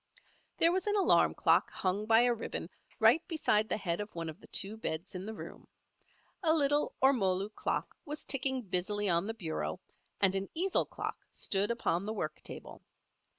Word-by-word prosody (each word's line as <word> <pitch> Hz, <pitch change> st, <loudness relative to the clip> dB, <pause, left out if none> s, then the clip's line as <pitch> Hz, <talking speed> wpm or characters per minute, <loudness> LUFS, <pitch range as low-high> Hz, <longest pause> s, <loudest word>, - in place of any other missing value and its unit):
There 335 Hz, -, +5 dB
was 375 Hz, +2 st, -1 dB
an 415 Hz, -, +2 dB
alarm 400 Hz, -, +4 dB
clock -, -, +3 dB
hung 195 Hz, +3 st, -2 dB
by 225 Hz, +1 st, +6 dB
a 245 Hz, 0 st, +3 dB
ribbon 235 Hz, -, -5 dB, 0.3 s
right 230 Hz, +8 st, +6 dB
beside 220 Hz, -10 st, +1 dB
the -, -, 0 dB
head 180 Hz, -2 st, -2 dB
of 210 Hz, -2 st, -8 dB
one 165 Hz, -1 st, -4 dB
of 155 Hz, -, -9 dB
the -, -, -15 dB
two 200 Hz, +3 st, +3 dB
beds 175 Hz, -5 st, -5 dB
in 185 Hz, +2 st, -6 dB
the 220 Hz, -, -4 dB
room. -, -, -10 dB, 0.7 s
A 325 Hz, -4 st, +3 dB
little 290 Hz, -1 st, +2 dB
ormolu 200 Hz, -7 st, +3 dB
clock -, -, -3 dB
was 300 Hz, 0 st, -7 dB
ticking 265 Hz, -1 st, -1 dB
busily 205 Hz, +2 st, 0 dB
on 170 Hz, +3 st, +1 dB
the 225 Hz, -, -4 dB
bureau, 155 Hz, -, -4 dB, 0.4 s
and 195 Hz, -2 st, +4 dB
an 195 Hz, 0 st, -2 dB
easel 370 Hz, +3 st, +1 dB
clock -, -, -6 dB
stood 200 Hz, +1 st, -1 dB
upon 200 Hz, -6 st, 0 dB
the 215 Hz, -, -2 dB
work 220 Hz, -, -4 dB
table. -, -, -10 dB
215 Hz, 185 wpm, -32 LUFS, 190-265 Hz, 0.7 s, by